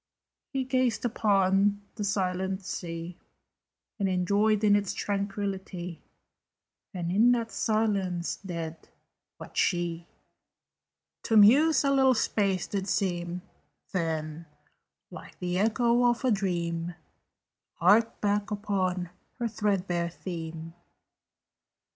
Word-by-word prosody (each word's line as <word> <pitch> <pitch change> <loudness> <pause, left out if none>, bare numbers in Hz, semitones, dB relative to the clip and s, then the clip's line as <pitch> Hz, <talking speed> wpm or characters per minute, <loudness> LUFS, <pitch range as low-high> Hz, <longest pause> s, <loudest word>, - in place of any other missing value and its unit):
He 270 -1 -1
gazed 255 -3 0
upon 200 -2 +2
the 210 - -5
sleeping 190 -1 -1
sea, 170 -2 -6 0.8
And 185 -2 0
joyed 210 +1 +2
in 205 -1 +5
its 205 -1 -1
tranquillity, 195 -3 -3 0.9
And 175 -4 -3
in 225 +6 +5
that 230 -2 -2
silence 200 -6 0
dead, 165 -3 -6 0.5
but - - -11
she 175 -1 0 1.1
To 225 - +2
muse 280 +11 +6
a 275 - +2
little 265 -2 +4
space 195 -4 0
did 195 -2 -3
seem, 175 -2 -1 0.5
Then, 160 -2 -3 0.6
like - - -11
the 180 0 -2
echo 235 +3 +2
of 240 +2 -1
a 255 - +3
dream, 175 -4 -1 0.8
Harped 210 +6 +3
back 205 0 0
upon 190 -4 -1 0.3
her 240 -2 -1
threadbare 195 -5 -1
theme. 165 -2 -7
195 Hz, 105 wpm, -28 LUFS, 175-215 Hz, 1.1 s, muse